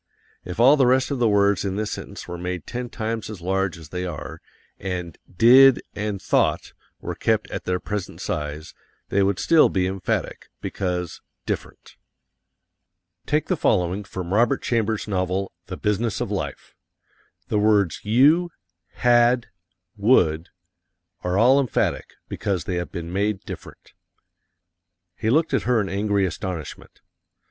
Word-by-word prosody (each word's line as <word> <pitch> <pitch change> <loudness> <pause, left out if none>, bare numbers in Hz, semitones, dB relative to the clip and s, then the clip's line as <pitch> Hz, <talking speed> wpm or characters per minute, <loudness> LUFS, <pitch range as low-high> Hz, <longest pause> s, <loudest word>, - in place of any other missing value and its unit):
If 90 +3 -7
all 135 +5 +7
the 135 -3 +4
rest 130 +2 +2
of 140 - -2
the 120 -2 +3
words 100 -2 +3
in 95 -1 -2
this 105 0 -2
sentence - - -7
were 85 - -6
made 90 -1 -4
ten 125 0 -5
times 110 -1 -4
as 105 -4 -7
large 95 0 -1
as 80 -3 -12
they 90 +2 -4
are, 85 -5 -6 0.4
and 90 -4 -4 0.2
DID 125 +7 +7
and 105 -1 -3
THOUGHT - - 0 0.3
were - - -4
kept - - 0
at - - -5
their 90 0 0
present 105 -1 -5
size, 75 +1 -4 0.4
they 100 - +2
would 100 -1 +2
still 165 +7 +5
be 95 -1 0
emphatic, 95 -1 -3
because 90 -3 -3 0.2
different. - - -6 1.3
Take 150 +1 +1
the 185 - 0
following 95 - +1
from 95 -2 -5
Robert 120 +6 +2
Chambers' 110 -3 0
novel, 95 -1 -1 0.2
"The 90 - -6
Business 105 +1 -1
of - - -3
Life." - - -5 0.8
The 105 - +1
words 105 -6 +2
you, 145 +11 +4 0.4
had, 120 0 +3 0.5
would, 95 -7 +3 0.7
are 90 +1 0
all 125 +6 +5
emphatic, 130 -5 -1
because 100 -5 -2
they 90 - -3
have 85 - -4
been 85 -2 -6
made 100 0 0
different. - - -11 1.2
He 110 - -2
looked 155 +7 +2
at - - +2
her 125 -2 +4
in 100 -2 -1
angry 100 0 +1
astonishment. 90 -3 -6
100 Hz, 150 wpm, -23 LUFS, 90-115 Hz, 1.3 s, all